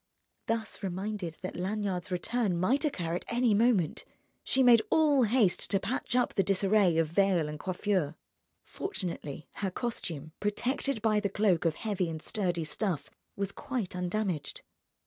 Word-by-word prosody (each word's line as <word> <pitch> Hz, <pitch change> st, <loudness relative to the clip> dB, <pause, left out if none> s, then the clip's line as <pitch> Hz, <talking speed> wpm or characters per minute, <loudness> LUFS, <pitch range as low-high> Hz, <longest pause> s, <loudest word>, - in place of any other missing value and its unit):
Thus 225 Hz, -2 st, -2 dB
reminded 190 Hz, -2 st, -4 dB
that 185 Hz, -, -4 dB
Lanyard's 190 Hz, -1 st, -2 dB
return 195 Hz, +1 st, 0 dB
might 250 Hz, -, +2 dB
occur 175 Hz, -, -1 dB
at 175 Hz, -, -3 dB
any 235 Hz, -1 st, +2 dB
moment, 205 Hz, -7 st, +2 dB, 0.4 s
she 265 Hz, -, +3 dB
made 240 Hz, -3 st, +7 dB
all 300 Hz, -4 st, +4 dB
haste 215 Hz, -5 st, +2 dB
to 195 Hz, -, +2 dB
patch 240 Hz, +3 st, -2 dB
up 250 Hz, -, +2 dB
the 195 Hz, -, +3 dB
disarray 195 Hz, -2 st, +3 dB
of 165 Hz, -, +4 dB
veil 175 Hz, -1 st, +2 dB
and 150 Hz, 0 st, -6 dB
coiffure. 185 Hz, -4 st, -1 dB, 0.5 s
Fortunately 175 Hz, -, -5 dB
her 195 Hz, -, -1 dB
costume, 170 Hz, -, -4 dB
protected 240 Hz, +3 st, -1 dB
by 215 Hz, -2 st, +3 dB
the 205 Hz, -1 st, -1 dB
cloak 195 Hz, -4 st, +2 dB
of 160 Hz, -2 st, +2 dB
heavy 200 Hz, -6 st, -1 dB
and 160 Hz, -1 st, -4 dB
sturdy 175 Hz, -2 st, -1 dB
stuff, 175 Hz, +1 st, -2 dB, 0.2 s
was 200 Hz, 0 st, -2 dB
quite 240 Hz, -9 st, -4 dB
undamaged. 180 Hz, -3 st, -2 dB
195 Hz, 150 wpm, -30 LUFS, 175-220 Hz, 0.5 s, made